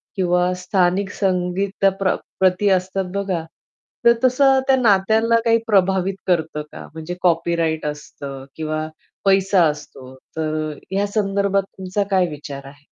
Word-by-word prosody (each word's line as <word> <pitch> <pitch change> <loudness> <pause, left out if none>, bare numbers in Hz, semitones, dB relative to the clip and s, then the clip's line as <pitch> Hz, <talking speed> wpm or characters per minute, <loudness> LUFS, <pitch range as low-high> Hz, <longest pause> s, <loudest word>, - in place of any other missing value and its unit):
किंवा 180 -1 +1
स्थानिक 185 +1 +1
संगीताप्र 190 +1 0 0.2
प्रती 190 +2 +3
असतात 190 0 0
बघा. 190 -4 -1 0.6
तर 235 - +8
तसं 265 +1 +4
त्या 270 - +5
नात्यांना 220 0 +3
काही 230 0 +5
प्रभावित 190 -2 +2
करतं 160 -4 0
का? - - -10
म्हणजे 160 +2 -6
कॉपीराइट 165 -2 +1
असतं 140 -2 -7
किंवा 155 0 -3 0.4
पैसा 195 -1 +4
असतो, 150 -3 -7 0.2
तर 155 -1 -2
या 200 +1 0
संदर्भात 200 -1 0
तुमचा 190 +2 -1
काय 185 -2 +3
विचार 140 -2 -8
आहे? 145 +1 -16
185 Hz, 125 wpm, -21 LUFS, 160-195 Hz, 0.6 s, तर